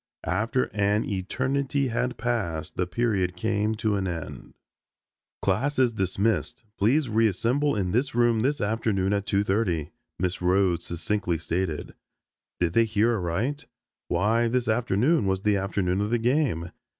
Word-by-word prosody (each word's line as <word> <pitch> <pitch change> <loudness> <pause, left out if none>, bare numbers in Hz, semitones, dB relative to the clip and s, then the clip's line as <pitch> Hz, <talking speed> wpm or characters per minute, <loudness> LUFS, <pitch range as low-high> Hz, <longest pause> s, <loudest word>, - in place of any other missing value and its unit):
After 115 +4 +1
an 105 +1 +2
eternity 130 +7 -1
had 125 +2 -1
passed 100 -10 -2
the 90 - -1
period 95 -3 0
came 110 +2 0
to 105 -1 0
an 95 -1 -1
end. 85 -3 -6 0.9
"Class 130 +10 +1
is 125 -3 +3
dismissed. 95 -3 -1 0.2
Please 130 +8 +3
reassemble 115 +6 +1
in 95 -4 -1
this 125 +4 0
room 120 -2 +3
this 140 +5 0
afternoon 105 -2 0
at 100 0 -1
2.30," 95 -6 0 0.3
Miss 90 0 -2
Rhodes 90 -1 +2
succinctly 85 +1 -1
stated. 85 0 -3 0.7
Did 85 -1 +1
they 115 +3 +4
hear 110 +2 +2
aright? 105 - -2 0.4
Why, 110 +7 +2
this 125 +1 0
afternoon 115 - +2
was 95 0 0
the 105 -1 +3
afternoon 95 -1 -1
of 105 - -1
the 120 - +2
game. 120 - 0
105 Hz, 140 wpm, -26 LUFS, 95-120 Hz, 0.9 s, they